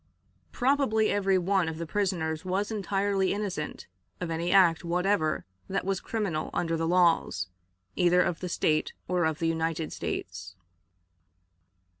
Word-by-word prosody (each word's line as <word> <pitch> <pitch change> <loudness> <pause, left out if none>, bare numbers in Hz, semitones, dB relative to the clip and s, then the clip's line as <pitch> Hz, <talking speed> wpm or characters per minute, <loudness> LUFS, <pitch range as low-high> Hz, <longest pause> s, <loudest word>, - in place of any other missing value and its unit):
Probably 245 -5 +2
every 195 -2 +2
one 185 -1 +1
of 160 - -6
the 170 - -4
prisoners 165 -4 -1
was 195 +4 -1
entirely 195 -1 0
innocent 190 -8 -4 0.3
of 170 - -3
any 170 +2 -1
act 180 -4 +5
whatever 175 -1 0 0.2
that 195 0 -1
was 195 -1 0
criminal 195 -9 -2
under 165 -1 0
the 165 0 -1
laws, 165 - +2 0.5
either 180 0 +4
of 170 - -2
the 180 - -4
State 155 -2 +1
or 180 -2 +1
of 160 -1 0
the 165 - -1
United 165 -1 -1
States. 90 +2 -5
175 Hz, 140 wpm, -28 LUFS, 160-195 Hz, 0.5 s, act